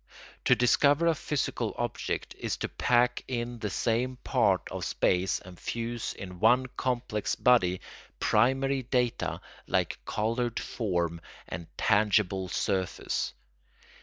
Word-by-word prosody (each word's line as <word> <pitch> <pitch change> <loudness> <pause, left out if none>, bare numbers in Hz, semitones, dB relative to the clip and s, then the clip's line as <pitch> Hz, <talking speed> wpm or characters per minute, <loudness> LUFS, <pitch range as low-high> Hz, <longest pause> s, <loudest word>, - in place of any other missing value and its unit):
To - - +6
discover 145 +6 +4
a 165 - +5
physical 150 -2 -2
object - - -3
is - - -2
to - - -3
pack 125 0 +2
in 120 -1 -3
the 105 - -2
same 120 +6 0
part - - +2
of - - -4
space, 90 +1 +1
and 90 -1 -13
fuse 115 0 -3
in 90 -2 -8
one 125 +5 +5
complex 120 -4 -1
body, 95 -8 +3 0.4
primary 135 +4 +2
data 125 -1 -1 0.3
like - - 0
coloured 115 +2 -1
form 85 -7 -2 0.3
and 85 -1 -6
tangible 100 -3 +2
surface. 95 0 -1
115 Hz, 120 wpm, -29 LUFS, 95-125 Hz, 0.4 s, To